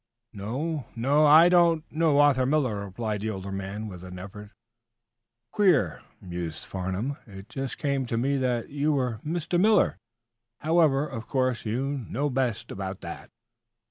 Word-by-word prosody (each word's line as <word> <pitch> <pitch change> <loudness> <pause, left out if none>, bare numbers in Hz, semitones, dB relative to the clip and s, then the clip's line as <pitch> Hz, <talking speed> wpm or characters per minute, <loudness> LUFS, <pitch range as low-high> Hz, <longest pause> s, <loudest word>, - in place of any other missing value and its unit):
"No 130 +9 -3 0.2
o; 145 +3 +5
I 160 +3 +8
don't 170 -3 +4
know 155 -2 +2
Arthur 135 -3 +4
Miller," 130 -9 +1
replied 105 +1 -3
the 110 - -2
older 100 -2 -5
man; 100 +3 -5
with 90 -3 -9
an 90 0 -8
effort. 100 +3 -9 1.0
"Queer," 160 - +2 0.2
mused 85 -3 -6
Mr. - - -12
Farnum. 95 +9 -3
"It 95 0 -11
just 135 -1 -4
came 140 -3 -1
to 115 - -1
me 135 +4 +1
that 125 -3 -1
you 145 +2 0
were 125 -6 -1
Mr. 170 +2 -1
Miller. 210 0 +4 0.6
However, 155 -3 +3
of 115 -5 -7
course 130 -4 0
you 135 +4 -2
know 145 +4 -1
best 125 -4 -1
about 95 0 -5
that." 85 - -8
130 Hz, 155 wpm, -27 LUFS, 100-145 Hz, 1.0 s, I